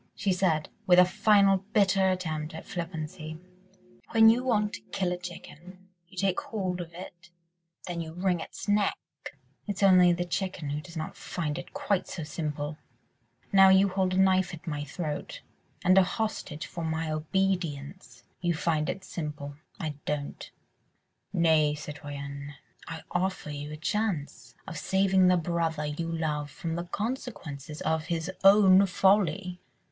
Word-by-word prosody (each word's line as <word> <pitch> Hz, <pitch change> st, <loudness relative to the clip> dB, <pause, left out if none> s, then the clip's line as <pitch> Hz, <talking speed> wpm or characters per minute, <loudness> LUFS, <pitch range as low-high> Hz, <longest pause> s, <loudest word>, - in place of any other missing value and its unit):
she 195 Hz, -2 st, +1 dB
said, 170 Hz, -4 st, +1 dB, 0.2 s
with 180 Hz, -1 st, +6 dB
a 180 Hz, -, +9 dB
final 195 Hz, +1 st, +4 dB, 0.2 s
bitter 195 Hz, -2 st, +4 dB
attempt 160 Hz, -4 st, -3 dB
at 160 Hz, -, -8 dB
flippancy, 160 Hz, -2 st, -5 dB, 0.7 s
"when 225 Hz, 0 st, +7 dB
you 245 Hz, +2 st, 0 dB
want 210 Hz, -5 st, +1 dB
to -, -, -6 dB
kill 185 Hz, -2 st, 0 dB
a 180 Hz, -, -1 dB
chicken... 180 Hz, +1 st, -11 dB, 0.2 s
you 185 Hz, -, -18 dB
take 190 Hz, 0 st, +1 dB
hold 185 Hz, -5 st, -3 dB
of 170 Hz, -1 st, -8 dB
it... 175 Hz, 0 st, -11 dB, 0.6 s
then 175 Hz, -1 st, -3 dB
you 160 Hz, -1 st, -6 dB
wring 180 Hz, +1 st, 0 dB
its 165 Hz, -, -8 dB
neck... 205 Hz, 0 st, +2 dB, 0.7 s
it's 205 Hz, 0 st, -2 dB
only 185 Hz, -2 st, +7 dB
the 175 Hz, +1 st, 0 dB
chicken 175 Hz, -4 st, -3 dB
who 150 Hz, +1 st, -2 dB
does 170 Hz, +2 st, -10 dB
not 155 Hz, -, -4 dB
find 150 Hz, -4 st, -3 dB
it -, -, -10 dB
quite 200 Hz, -3 st, -1 dB
so 170 Hz, -, -5 dB
simple. 150 Hz, -1 st, -4 dB, 0.7 s
Now 195 Hz, -1 st, +8 dB
you 190 Hz, +1 st, +6 dB
hold 185 Hz, -1 st, 0 dB
a -, -, 0 dB
knife 190 Hz, -2 st, +3 dB
at 160 Hz, -, -16 dB
my 150 Hz, -3 st, -3 dB
throat, 150 Hz, 0 st, -5 dB, 0.4 s
and 185 Hz, +1 st, +5 dB
a -, -, +6 dB
hostage 185 Hz, -5 st, -3 dB
for 170 Hz, -, -6 dB
my 160 Hz, 0 st, -2 dB
obedience.... 155 Hz, -7 st, -2 dB, 0.2 s
You 175 Hz, -1 st, +1 dB
find 155 Hz, -1 st, 0 dB
it 190 Hz, -, -4 dB
simple.... 150 Hz, -5 st, -6 dB, 0.2 s
I 155 Hz, -2 st, -3 dB
don't." 145 Hz, -1 st, -4 dB, 0.8 s
"Nay, 160 Hz, -5 st, +3 dB
citoyenne, 145 Hz, -1 st, -7 dB, 0.3 s
I 165 Hz, -1 st, -7 dB
offer 185 Hz, -4 st, -1 dB
you 145 Hz, +1 st, -6 dB
a 155 Hz, -, -6 dB
chance 160 Hz, -, -2 dB
of 165 Hz, -, -5 dB
saving 190 Hz, -1 st, +3 dB
the 180 Hz, 0 st, +5 dB
brother 165 Hz, -2 st, -1 dB
you 165 Hz, +3 st, -3 dB
love 150 Hz, -3 st, -2 dB
from 165 Hz, +3 st, -5 dB
the 170 Hz, +1 st, -3 dB
consequences 175 Hz, -, -5 dB
of 160 Hz, 0 st, 0 dB
his 165 Hz, +1 st, -2 dB
own 195 Hz, -1 st, +7 dB
folly." 185 Hz, -1 st, +2 dB
175 Hz, 155 wpm, -28 LUFS, 155-190 Hz, 0.8 s, a